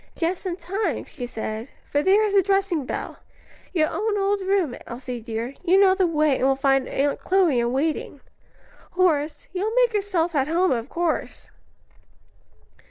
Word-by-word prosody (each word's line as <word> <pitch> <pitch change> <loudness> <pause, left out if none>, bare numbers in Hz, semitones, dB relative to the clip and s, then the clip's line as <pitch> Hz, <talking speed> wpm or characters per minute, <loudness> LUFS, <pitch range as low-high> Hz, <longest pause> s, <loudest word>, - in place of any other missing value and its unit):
"Just 355 +3 -2
in 350 - -2
time," 380 +5 -3
she 250 -5 -7
said, 220 0 -5 0.2
"for 290 - 0
there 395 +5 +4
is 410 - -1
the 395 - +6
dressing 390 -7 0
bell. - - -5 0.5
Your 315 -4 +2
own 425 0 -1
old 400 0 +1
room, 380 -8 +1
Elsie 245 0 -6
dear: 230 +3 -4
you 370 +2 +4
know 385 -1 +6
the 380 -1 +2
way 305 -4 +2
and - - +1
will 270 - +3
find 270 -1 +2
Aunt 285 +1 0
Chloe 365 -9 +2
in 235 0 0
waiting. 295 +5 -2 0.7
Horace, 310 -5 +1
you 370 +1 -2
will 440 +2 -1
make - - +3
yourself 375 -5 0
at 275 -3 +1
home 350 +4 +2
of 240 +1 -2
course." 340 -2 -3
335 Hz, 170 wpm, -24 LUFS, 270-390 Hz, 0.7 s, the